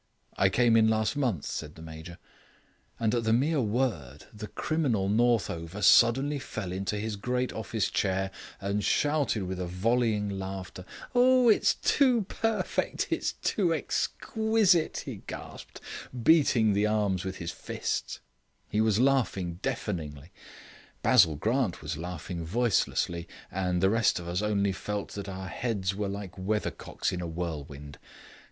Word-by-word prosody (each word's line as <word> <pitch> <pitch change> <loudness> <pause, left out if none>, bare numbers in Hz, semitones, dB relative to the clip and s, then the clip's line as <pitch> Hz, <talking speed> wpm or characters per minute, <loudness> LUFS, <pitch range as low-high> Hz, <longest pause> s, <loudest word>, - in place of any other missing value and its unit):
"I 95 - +3
came 120 +3 +3
in 110 -1 +5
last 110 +2 +1
month," 120 - -1
said 75 -1 -5
the - - -12
Major. 80 +2 -9 0.8
And 110 -1 +1
at 120 -1 +1
the 110 - +1
mere 140 +6 +2
word 110 - -2
the 105 0 -7
criminal 120 -6 0
Northover 105 -5 0
suddenly 135 +5 +5
fell 110 -8 -5
into 95 +3 -2
his 110 0 -3
great 125 +4 -2
office 110 -1 -1
chair 95 0 0 0.3
and 100 +1 -1
shouted 145 -8 +1
with 95 0 -4
a 90 - -3
volleying 110 +3 +1
laughter. 95 -2 -6 0.3
"Oh! 250 0 +5
it's 215 - +4
too 255 -6 +3
perfect 225 +3 -1
it's - - 0
too 175 -6 0
exquisite," 215 - +1
he - - -7
gasped, - - -9 0.4
beating 120 -8 +4
the 105 +2 +2
arms 105 -4 0
with 95 0 -5
his 85 -1 -4
fists. - - -4 0.5
He 105 - +1
was 110 -1 +2
laughing 115 -10 +1
deafeningly; 85 - -4 0.7
Basil 80 -3 +5
Grant 110 - 0
was 75 +1 -3
laughing 85 +1 -5
voicelessly; 90 -4 0 0.2
and 90 0 -1
the 95 - +5
rest 115 0 +3
of 85 -1 -6
us 90 +3 -1
only 100 -2 +1
felt 100 +2 -4
that 100 -1 -6
our 95 0 -6
heads 100 -2 -2
were 100 0 -2
like 100 -1 -6
weathercocks 105 +3 -2
in 90 - -3
a 85 - -3
whirlwind. 75 -4 -6
105 Hz, 145 wpm, -28 LUFS, 90-120 Hz, 0.8 s, in